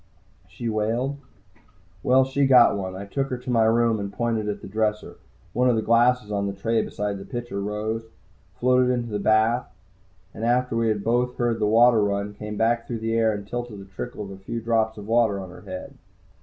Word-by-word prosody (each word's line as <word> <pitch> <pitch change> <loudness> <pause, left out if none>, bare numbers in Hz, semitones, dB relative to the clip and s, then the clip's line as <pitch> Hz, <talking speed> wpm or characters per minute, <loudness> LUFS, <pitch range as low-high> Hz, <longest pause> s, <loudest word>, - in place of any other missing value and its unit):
she 120 +5 -6
wailed. 115 +6 -1 0.8
Well, 130 +4 +4
she 135 +1 +1
got 125 -5 +6
one. 95 -2 -4
I 100 +2 -6
took 135 +7 -2
her 125 - -2
to 125 - -9
my 115 -2 +4
room, 110 -3 +2
pointed 115 -2 -1
at 105 - -5
the - - -7
dresser. 105 +1 -2 0.4
One 125 +1 +3
of 120 - +3
the 110 - 0
glasses 115 -1 +3
on 100 -1 -1
the 100 - -3
tray 115 +4 0
beside 105 -1 -3
a - - -8
pitcher 120 -4 -5
rose, 105 +2 -3 0.5
floated 125 +3 +3
into 120 -2 -2
the 105 - -2
bath 110 +4 +2 0.7
and, 110 - -7
after 125 +1 +1
we 115 0 +1
had 105 -2 0
both 125 +2 0
heard 120 -2 0
the 105 - +1
water 115 0 +5
run, 100 0 -1
came 105 0 -7
back 115 +1 +1
through 120 - -3
the 115 0 -1
air 115 -1 +3
and 100 -1 -5
tilted 120 -2 -5
to 100 - -10
trickle 105 -2 -6
a - - -10
few 115 +5 -5
drops 110 -1 0
of 105 - -8
water 115 -3 +2
onto 95 -2 -8
her - - -12
head. 95 -2 -8
115 Hz, 210 wpm, -24 LUFS, 105-120 Hz, 0.8 s, got